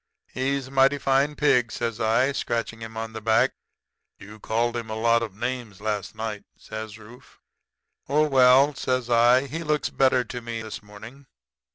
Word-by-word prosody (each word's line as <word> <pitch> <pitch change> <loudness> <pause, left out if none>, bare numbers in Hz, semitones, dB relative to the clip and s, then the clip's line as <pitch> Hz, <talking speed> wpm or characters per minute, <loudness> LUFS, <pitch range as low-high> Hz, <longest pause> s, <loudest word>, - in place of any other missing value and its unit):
"'He's 135 +1 -1
a 130 - -13
mighty 135 +1 +4
fine 140 +2 +1
pig,' 125 -5 +2
says 115 -2 -3
I, 115 +5 +2
scratching 115 -3 -3
him 110 0 -8
on 110 0 -5
the 110 - -6
back. 110 +1 +3 0.7
"'You 105 +2 -13
called 115 +3 -1
him 115 -2 -5
a 110 - -4
lot 115 +1 +2
of 110 -4 -5
names 120 -3 -4
last 105 -1 -3
night,' 110 -1 -5
says 110 0 -8
Rufe. 115 +3 -16 0.7
"'Oh, 150 +2 +3
well,' 135 +1 +5
says 130 -2 -2
I, 120 +3 +5
'he 155 +5 -5
looks 150 -2 -1
better 130 -2 +3
to 125 +1 -7
me 115 -1 -5
this 110 - -7
morning. 110 +6 -13
120 Hz, 175 wpm, -25 LUFS, 110-135 Hz, 0.7 s, well